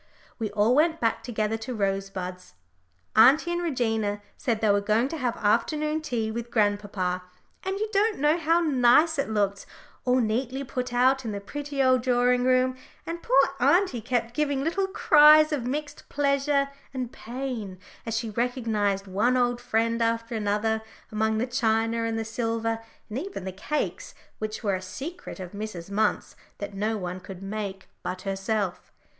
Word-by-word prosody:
We 220 Hz, -2 st, -1 dB
all 215 Hz, +3 st, +3 dB
went 320 Hz, +4 st, +3 dB
back 230 Hz, -1 st, 0 dB
together 220 Hz, -2 st, -1 dB
to 235 Hz, +3 st, -6 dB
Rosebuds. 195 Hz, -, -3 dB, 0.6 s
Auntie 280 Hz, +10 st, +6 dB
and 345 Hz, 0 st, -1 dB
Regina 225 Hz, -9 st, 0 dB, 0.2 s
said 235 Hz, -6 st, -1 dB
they 215 Hz, -2 st, +3 dB
were 200 Hz, 0 st, +3 dB
going 215 Hz, +4 st, +2 dB
to 325 Hz, -, -4 dB
have 245 Hz, -5 st, -1 dB
afternoon 300 Hz, +9 st, +1 dB
tea 235 Hz, -8 st, -2 dB
with 235 Hz, +1 st, -5 dB
grandpapa, 205 Hz, -4 st, 0 dB, 0.4 s
and 385 Hz, +1 st, -3 dB
you 430 Hz, +2 st, -1 dB
don't 415 Hz, +1 st, +2 dB
know 295 Hz, +2 st, +3 dB
how 330 Hz, +1 st, +3 dB
nice 295 Hz, +1 st, +4 dB
it 275 Hz, -, 0 dB
looked, 200 Hz, -2 st, -1 dB, 0.4 s
all 250 Hz, 0 st, +2 dB
neatly 250 Hz, +4 st, -1 dB
put 250 Hz, -2 st, -4 dB
out 260 Hz, +2 st, +3 dB
in 220 Hz, -3 st, -4 dB
the 200 Hz, -, -3 dB
pretty 285 Hz, +6 st, -3 dB
old 255 Hz, -1 st, +4 dB
drawing 245 Hz, 0 st, +2 dB
room, 255 Hz, 0 st, +3 dB, 0.3 s
and 335 Hz, +1 st, -5 dB
poor 275 Hz, +1 st, +4 dB
auntie 280 Hz, -, +3 dB
kept 240 Hz, 0 st, -1 dB
giving 285 Hz, -2 st, 0 dB
little 385 Hz, +5 st, 0 dB
cries 305 Hz, -5 st, +6 dB
of 255 Hz, -5 st, -2 dB
mixed 295 Hz, +2 st, -5 dB
pleasure 280 Hz, 0 st, +1 dB, 0.3 s
and 250 Hz, -2 st, -3 dB
pain 235 Hz, -6 st, -5 dB, 0.3 s
as 225 Hz, -1 st, -2 dB
she 225 Hz, -1 st, -3 dB
recognised 220 Hz, -4 st, 0 dB
one 215 Hz, +7 st, +1 dB
old 245 Hz, -1 st, +1 dB
friend 230 Hz, -1 st, 0 dB
after 230 Hz, 0 st, 0 dB
another 220 Hz, +1 st, 0 dB, 0.3 s
among 220 Hz, 0 st, +1 dB
the 230 Hz, -, +1 dB
china 230 Hz, -2 st, +1 dB
and 225 Hz, 0 st, -1 dB
the 225 Hz, -, -2 dB
silver, 225 Hz, 0 st, -1 dB, 0.3 s
and 220 Hz, +4 st, -4 dB
even 370 Hz, -, -6 dB
the 190 Hz, -, -4 dB
cakes, 210 Hz, +11 st, -3 dB, 0.2 s
which 215 Hz, +1 st, -4 dB
were 200 Hz, -2 st, +1 dB
a 185 Hz, -, -2 dB
secret 275 Hz, -, -7 dB
of 180 Hz, -2 st, -7 dB
Mrs. 200 Hz, -4 st, -6 dB
Munt's 210 Hz, -1 st, 0 dB, 0.2 s
that 205 Hz, 0 st, -6 dB
no 215 Hz, +3 st, -1 dB
one 180 Hz, -1 st, -4 dB
could 185 Hz, 0 st, -10 dB
make 195 Hz, -1 st, -5 dB
but 185 Hz, 0 st, -5 dB
herself. 195 Hz, -1 st, -2 dB
230 Hz, 170 wpm, -26 LUFS, 210-270 Hz, 0.6 s, Auntie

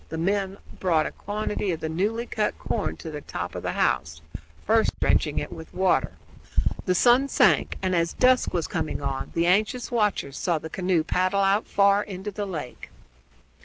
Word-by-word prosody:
The 160 Hz, -, -4 dB
men 195 Hz, +3 st, 0 dB
also -, -, -21 dB, 0.2 s
brought 165 Hz, -4 st, +2 dB
a -, -, -3 dB
quantity 210 Hz, 0 st, -3 dB
of 165 Hz, -3 st, -1 dB
the -, -, -3 dB
newly 205 Hz, +9 st, -1 dB
cut 215 Hz, -3 st, -1 dB
corn 215 Hz, -, -2 dB
to 160 Hz, -, -7 dB
the 150 Hz, -1 st, -6 dB
top -, -, -5 dB
of -, -, -5 dB
the -, -, -2 dB
house, 75 Hz, +1 st, 0 dB, 0.4 s
first -, -, +2 dB
drenching -, -, +1 dB
it -, -, -2 dB
with 160 Hz, 0 st, -9 dB
water. 185 Hz, 0 st, +2 dB, 0.7 s
The 180 Hz, -, +3 dB
sun 245 Hz, +7 st, +5 dB
sank, -, -, +3 dB
and 185 Hz, -1 st, +1 dB
as 170 Hz, -1 st, +1 dB
dusk 255 Hz, 0 st, +3 dB
was 170 Hz, -3 st, -1 dB
coming 155 Hz, -3 st, -3 dB
on 135 Hz, -1 st, -3 dB
the 170 Hz, -, +2 dB
anxious 215 Hz, +8 st, +1 dB
watchers 210 Hz, -, 0 dB
saw 170 Hz, -3 st, +1 dB
the 160 Hz, +1 st, -8 dB
canoe 180 Hz, -3 st, +1 dB
paddle 185 Hz, +4 st, +1 dB
out 195 Hz, +2 st, +2 dB
far 200 Hz, 0 st, +3 dB
into 195 Hz, +1 st, -6 dB
the 205 Hz, 0 st, -4 dB
lake. 150 Hz, -9 st, -7 dB
185 Hz, 190 wpm, -25 LUFS, 160-205 Hz, 0.7 s, sun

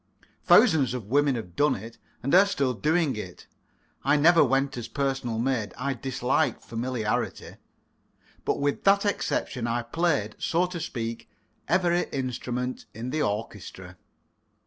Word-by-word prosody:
Thousands 135 Hz, -6 st, +5 dB
of 120 Hz, -5 st, -5 dB
women 145 Hz, -1 st, +3 dB
have 90 Hz, -7 st, -7 dB
done 145 Hz, -1 st, +3 dB
it, 115 Hz, +4 st, -10 dB, 0.2 s
and 140 Hz, -, -1 dB
are 190 Hz, +3 st, +7 dB
still 140 Hz, -10 st, 0 dB
doing 155 Hz, +3 st, +1 dB
it. 90 Hz, -5 st, -8 dB, 0.6 s
I 145 Hz, +2 st, +3 dB
never 165 Hz, +3 st, +6 dB
went 135 Hz, +1 st, +1 dB
as 120 Hz, -2 st, -5 dB
personal 135 Hz, -5 st, -2 dB
maid 115 Hz, -4 st, -1 dB
I 140 Hz, +2 st, -1 dB
dislike 130 Hz, +2 st, 0 dB
familiarity 115 Hz, -2 st, -3 dB, 0.9 s
but -, -, 0 dB
with 145 Hz, 0 st, -1 dB
that 200 Hz, +1 st, +4 dB
exception 130 Hz, -, -1 dB
I 120 Hz, +1 st, -1 dB
played, 135 Hz, -5 st, -1 dB
so 170 Hz, +2 st, +1 dB
to 180 Hz, -1 st, -5 dB
speak, 115 Hz, -6 st, -5 dB, 0.4 s
every 175 Hz, +1 st, +2 dB
instrument 125 Hz, -2 st, -4 dB
in 120 Hz, +3 st, -5 dB
the 155 Hz, -, -1 dB
orchestra. 100 Hz, -5 st, -4 dB
130 Hz, 140 wpm, -26 LUFS, 115-150 Hz, 0.9 s, are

